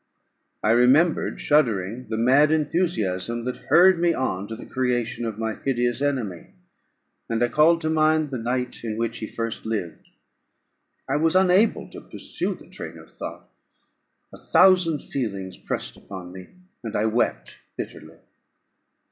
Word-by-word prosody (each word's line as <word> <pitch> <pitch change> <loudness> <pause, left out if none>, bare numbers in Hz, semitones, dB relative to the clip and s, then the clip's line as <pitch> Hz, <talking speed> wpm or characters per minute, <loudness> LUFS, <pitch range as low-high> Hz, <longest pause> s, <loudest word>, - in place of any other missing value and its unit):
I 110 - +3
remembered, 130 +8 +3
shuddering, 115 -5 +1
the 110 - -2
mad 135 +6 +4
enthusiasm 120 - -1
that 125 - -3
hurried 185 +1 +6
me 170 -1 +2
on 100 -7 -2
to 110 - -6
the 115 - -10
creation 120 -2 -1
of 110 -2 -4
my 110 0 -2
hideous 120 -1 -1
enemy, 120 -12 -2 0.8
and 115 +1 0
I 120 - +2
called 165 +4 +4
to 160 - -1
mind 155 -1 +2
the 130 - -3
night 125 +2 -3
in 110 -2 -3
which 115 0 -2
he 110 - -5
first 115 0 -4
lived. 105 -7 -4 1.0
I - - +1
was 160 +3 +2
unable 190 +4 +3
to - - -10
pursue - - -4
the - - -16
train - - -8
of - - -15
thought; - - -8 0.9
a - - -11
thousand 180 -5 +4
feelings 100 -8 -4
pressed - - -4
upon 90 -2 -10
me, 95 0 -10 0.4
and 115 - -5
I 105 - +1
wept 110 - -1 0.2
bitterly. - - -8
120 Hz, 150 wpm, -24 LUFS, 110-155 Hz, 1.0 s, hurried